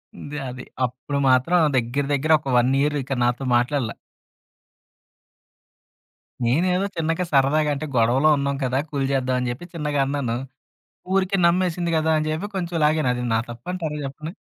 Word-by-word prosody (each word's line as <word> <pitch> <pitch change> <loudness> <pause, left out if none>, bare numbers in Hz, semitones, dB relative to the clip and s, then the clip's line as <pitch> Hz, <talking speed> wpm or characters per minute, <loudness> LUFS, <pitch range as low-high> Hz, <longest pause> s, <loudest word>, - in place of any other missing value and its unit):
ముందే 145 +1 -7
అది. 125 0 -8 0.2
అప్పుడు 130 +3 -5
మాత్రం 130 +8 +3 0.2
దగ్గర, 125 +4 0
దగ్గర 145 +3 0
ఒక 140 - -11
1 120 +2 +3
ఇయర్ 150 +1 +1
ఇక 135 - -4
నాతో 125 +2 0
మాట్లాడల. 125 0 -1 2.5
నేనేదో 180 +10 +2
చిన్నగా 165 +2 0
సరదాగా 145 +2 +3
అంటే 155 +2 -4
గొడవలో 120 +6 +4
ఉన్నాం 140 0 -1
కదా! 130 +1 0
కూల్ 140 -2 -1
జేద్దామని 125 -2 0
చెప్పి, 120 +8 -6
చిన్నగా 150 -3 -1
అన్నాను. 135 -4 -1 0.8
ఊరికే 195 0 +1
నమ్మేసింది 175 -1 +1
గదా! 160 0 +2
అని 155 - -1
చెప్పి 180 +7 -3
కొంచెం 175 -2 -3
లాగాను. 150 -3 +2
అది 125 0 -3
నా - - +3
తప్పంటారా 155 +6 -5
చెప్పండి? 155 +4 -7
145 Hz, 145 wpm, -23 LUFS, 130-160 Hz, 2.5 s, గొడవలో